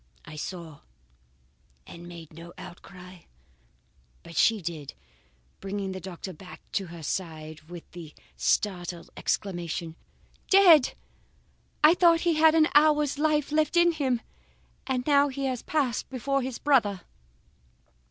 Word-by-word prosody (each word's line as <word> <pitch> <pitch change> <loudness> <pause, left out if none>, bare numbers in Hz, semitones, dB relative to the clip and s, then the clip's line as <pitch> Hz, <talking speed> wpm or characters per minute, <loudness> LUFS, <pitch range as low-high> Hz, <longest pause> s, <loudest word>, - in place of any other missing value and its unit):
"I 150 - -10
saw, 160 -1 -7 1.1
and 170 0 -11
made 170 -3 -11
no 165 +2 -11
outcry, 180 0 -12 1.0
but 170 0 -12
she 225 +5 +3
did, 160 -5 -6 0.6
bringing 195 0 -4
the 190 - -6
doctor 185 0 -8
back 180 +3 -12
to 195 - -2
her 170 -1 -10
side 155 -2 -5
with 175 -1 -9
the 165 -4 -11 0.2
startled 175 -4 -1
exclamation: 170 -4 -3 0.5
"'Dead? 355 -8 +6 0.9
I 310 +2 +8
thought 340 -2 +4
he 345 -2 +2
had 315 0 +5
an 315 -1 +4
hour's 295 -1 +4
life 300 -1 +1
left 310 +3 +1
in 345 0 +5
him, 265 -7 -1 0.7
and 255 -2 -1 0.3
he 275 -1 -2
has 255 -3 -2
passed 275 -7 -1
before 275 +2 -1
his 255 -1 -4
brother. 220 -10 +2
200 Hz, 125 wpm, -27 LUFS, -, 1.1 s, I